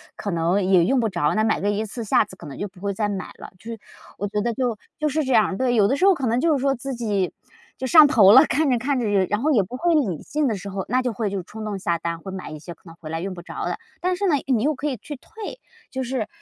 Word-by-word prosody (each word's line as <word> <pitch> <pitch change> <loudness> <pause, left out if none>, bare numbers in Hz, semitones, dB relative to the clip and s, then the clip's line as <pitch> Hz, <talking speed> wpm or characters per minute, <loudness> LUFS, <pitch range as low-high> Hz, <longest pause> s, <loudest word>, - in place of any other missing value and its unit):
可 200 - -4
能 170 +4 +1
也 185 -2 +4
用 265 +4 +2
不 225 - +1
着， 170 -6 0
那 215 - +2
买 220 - +1
个 200 - 0
一 210 +2 -1
次 225 +2 -6
下 210 - +3
次 - - -13
可 - - -12
能 140 - -9
就 205 - -3
不 185 - -18
会 200 0 -2
再 205 +1 -1
买 195 -2 -4
了。 - - -10
就 - - -22
是， 230 - -6 0.4
我 205 - -3
觉 210 +1 -2
得 235 +1 -1
就 245 -2 -1 0.2
就 305 -1 +1
是 310 +2 0
这 260 - 0
样， 215 -4 +3
对。 255 -2 +1
有 205 -3 +4
的 270 - +1
时 370 - +2
候 395 - +7
可 275 -7 -2
能 230 +2 +1
就 320 +3 +3
是 275 - 0
说 275 0 +2
自 270 +2 -5
己， 210 -6 -1 0.5
就 260 - -2
上 310 +2 +8
头 210 -8 +6
了， 265 +6 +8
看 290 +4 +1
着 250 - +3
看 270 +4 -1
着， 240 - -1 0.2
然 210 +3 -1
后 305 +3 +2
也 220 -8 +4
不 205 +7 -8
会 335 +5 +2
理 195 - 0
性 300 -1 -1
的 225 - 0
时 200 +1 -7
候， 190 -1 -4
那 255 +3 +1
就 250 - -1
会 215 -1 -2
就 195 - -2
冲 215 +4 -8
动 205 -2 -3
下 170 -2 0
单， 170 0 -4
会 190 +3 -8
买 185 -4 -7
一 155 - -7
些 175 +2 -9
可 - - -34
能 165 -1 -12
回 155 - -8
来 165 - -3
用 190 +1 -4
不 175 - -9
着 175 - -6
的。 - - -2 0.2
但 365 0 +1
是 400 +2 -1
呢， 325 - +3
你 255 -5 +1
又 300 +2 +1
可 290 +3 -3
以 270 - -1
去 290 +7 -8
退， 440 - -9 0.3
就 265 -2 -3
是 245 -3 -2
225 Hz, 335 characters per minute, -23 LUFS, 195-270 Hz, 0.5 s, 上